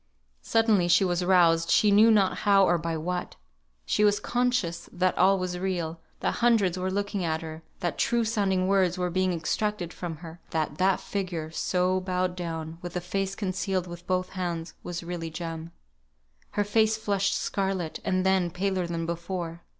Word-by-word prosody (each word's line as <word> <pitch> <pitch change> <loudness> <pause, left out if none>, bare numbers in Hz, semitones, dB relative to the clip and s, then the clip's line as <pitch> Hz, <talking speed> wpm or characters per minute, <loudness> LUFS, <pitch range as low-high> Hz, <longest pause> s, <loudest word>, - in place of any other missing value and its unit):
Suddenly 220 -6 +3
she 185 +3 +5
was 175 0 0
roused, 170 -2 +4
she 210 - +4
knew 215 +3 +7
not 200 -4 +3
how 200 -1 +4
or 175 -1 +2
by 165 0 -2
what. 180 +3 -3 0.5
She 210 - +1
was 205 0 +4
conscious 245 -8 -1
that 185 0 +1
all 195 +2 +4
was 180 -1 -3
real, 175 -3 -2 0.2
that - - -1
hundreds 220 -7 +3
were 185 0 -2
looking 200 0 -2
at 160 -1 -1
her, 160 0 -7 0.2
that 175 -4 -2
true 235 -1 +2
sounding 195 -4 +1
words 190 -2 +2
were 180 -1 -1
being 185 +1 +1
extracted 175 +2 -2
from 170 -2 -5
her; 165 +1 -10
that 155 -2 -2
that 190 0 +3
figure, 175 -6 -4
so 180 +2 +1
bowed 185 -1 -1
down, 165 -2 -5
with 175 -1 -7
the - - +1
face 195 +2 -2
concealed 185 -2 -2
by 175 - -6
both 185 0 0
hands, 175 -3 -4
was 175 0 -5
really 170 -1 -4
Jem. 165 0 -6 0.9
Her 205 - +4
face 220 +1 +2
flushed 200 -2 0
scarlet, 190 -4 -2
and 185 0 0
then 190 -2 +3
paler 185 0 -1
than 165 -1 -3
before. 170 0 -4
185 Hz, 175 wpm, -27 LUFS, 170-195 Hz, 0.9 s, knew